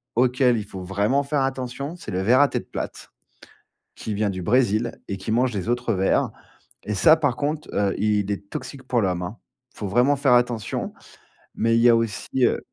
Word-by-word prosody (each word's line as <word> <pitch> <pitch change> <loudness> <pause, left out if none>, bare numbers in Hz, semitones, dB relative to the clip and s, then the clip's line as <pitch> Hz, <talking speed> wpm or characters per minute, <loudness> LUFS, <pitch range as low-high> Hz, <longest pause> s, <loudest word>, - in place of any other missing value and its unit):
auquel 125 0 +3
il 105 - -4
faut 95 -2 -8
vraiment 100 +9 +1
faire 145 0 0
attention, 135 +3 -3
c'est 180 - -9
le 90 - -1
ver 125 +7 +4
à 145 - +6
tête - - -4
plate, - - -6 0.8
qui 110 - -5
vient 105 0 0
du 95 -1 -4
Brésil 115 +2 +1
et 100 - -3
qui 95 +3 -5
mange 125 +2 +2
les 100 +1 -3
autres 120 -1 0
vers 95 0 +1 0.6
et 105 - -2
ça 105 +11 +6
par 145 -6 0
contre, 150 +1 -3
heu, 100 -1 +1
il 105 -1 +1
est 100 0 -7
toxique 140 -2 -7
pour 125 -2 0
l'homme, 90 -2 0
hein. 95 +6 -6 0.3
Faut 105 - -6
vraiment 125 +8 +3
faire 140 -2 +2
attention, 120 -3 0 0.6
mais 115 0 +2
il 115 - +3
y 120 - +7
a - - +6
aussi 115 -3 -2 0.2
heu - - +1
115 Hz, 205 wpm, -23 LUFS, 100-130 Hz, 0.8 s, y